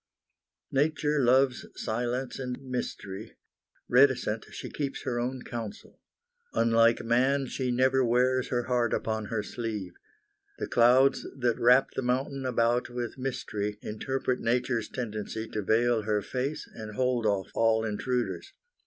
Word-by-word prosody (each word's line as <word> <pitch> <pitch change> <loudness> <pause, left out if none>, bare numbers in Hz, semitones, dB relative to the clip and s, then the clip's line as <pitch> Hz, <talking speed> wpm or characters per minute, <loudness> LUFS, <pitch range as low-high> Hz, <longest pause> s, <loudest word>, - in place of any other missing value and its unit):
Nature 150 +1 +1
loves 130 +1 +3
silence 125 +4 -2
and 125 -1 -4
mystery. 115 -5 -5 0.5
Reticent, 125 -4 +3
she - - -7
keeps 140 -2 -4
her 120 -1 -1
own 125 +1 -3
counsel. 115 -3 -7 0.5
Unlike 115 0 +4
man, 130 +4 +2
she 130 0 -3
never 130 +2 +3
wears 125 +2 +2
her 120 -1 0
heart 120 -2 +1
upon 110 -1 -2
her 105 -1 -2
sleeve. 105 -5 -5 0.6
The - - -3
clouds 125 +3 +4
that 120 -3 0
wrap 125 +3 +5
the - - -3
mountain 130 +2 -1
about 120 0 +1
with 120 +1 -5
mystery 105 -5 -3
interpret 130 +4 -2
nature's 120 -1 0
tendency 110 -2 -4
to 110 - -3
veil 115 +3 +2
her 105 -1 0
face 135 +4 -3
and 110 -2 -8
hold 125 -3 +1
off 100 -2 0
all 115 0 +2
intruders. 120 +3 -2
120 Hz, 135 wpm, -28 LUFS, 110-130 Hz, 0.6 s, wrap